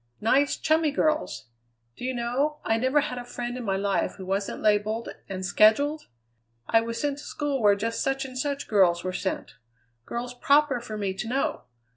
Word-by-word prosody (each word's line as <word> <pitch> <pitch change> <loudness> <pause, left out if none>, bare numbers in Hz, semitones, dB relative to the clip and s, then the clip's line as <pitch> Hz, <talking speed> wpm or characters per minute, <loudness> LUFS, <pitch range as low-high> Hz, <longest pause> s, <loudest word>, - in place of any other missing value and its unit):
Nice, 270 +6 +2
chummy 315 0 +2
girls. 305 - -1 0.5
Do - - -11
you 260 0 -1
know, 260 +6 -1
I 225 - +2
never 260 +5 +3
had 255 -4 -4
a - - -6
friend 245 0 -5
in 250 - -5
my 195 -3 0
life 200 0 0
who 190 - -9
wasn't 195 +2 -2
labelled 215 +2 +1 0.2
and 190 -1 -4
scheduled? 285 +11 +3 0.6
I 225 - +4
was 230 0 -4
sent 290 -1 -1
to - - -10
school 285 -3 -2
where 205 -1 +5
just 230 +3 -2
such 270 0 0
and 255 -1 -9
such 280 +2 -2
girls 180 -5 +3
were 185 0 -3
sent 190 +1 -4 0.5
girls 240 +1 -4
proper 280 +1 +3
for 220 -2 -7
me 200 -2 -1
to 195 +5 -5
know. 265 +4 -1
240 Hz, 190 wpm, -26 LUFS, 210-280 Hz, 0.6 s, where